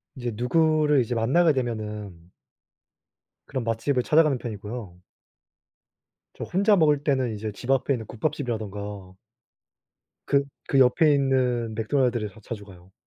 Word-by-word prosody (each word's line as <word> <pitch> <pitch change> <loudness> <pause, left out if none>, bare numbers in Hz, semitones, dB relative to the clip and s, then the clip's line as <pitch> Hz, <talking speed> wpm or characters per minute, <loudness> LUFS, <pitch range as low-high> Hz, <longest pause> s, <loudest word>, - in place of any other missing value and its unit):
이제 120 -2 -4
누구를 150 +3 +3
이제 120 +1 -2
만나게 150 +8 +3
되면은 105 -8 -5 1.2
그런 130 -3 -3
맛집을 120 +3 0
찾아가는 155 -4 +3
편이고요. 105 -4 -7 1.4
저 - - -5
혼자 200 +4 +3
먹을 150 -4 +3
때는 130 -5 0
이제 105 0 -5
집 125 +5 -4
앞에 135 +1 +2
있는 115 -3 -4
국밥집이라든가 105 -8 -4 1.1
그 140 0 +3 0.2
그 135 - +3
옆에 145 +4 +5
있는 125 -5 +1
맥도날드를 120 -1 0
더 110 - -17
자주 105 -1 -7
가요. 90 -1 -16
120 Hz, 290 characters per minute, -25 LUFS, 105-140 Hz, 1.4 s, 옆에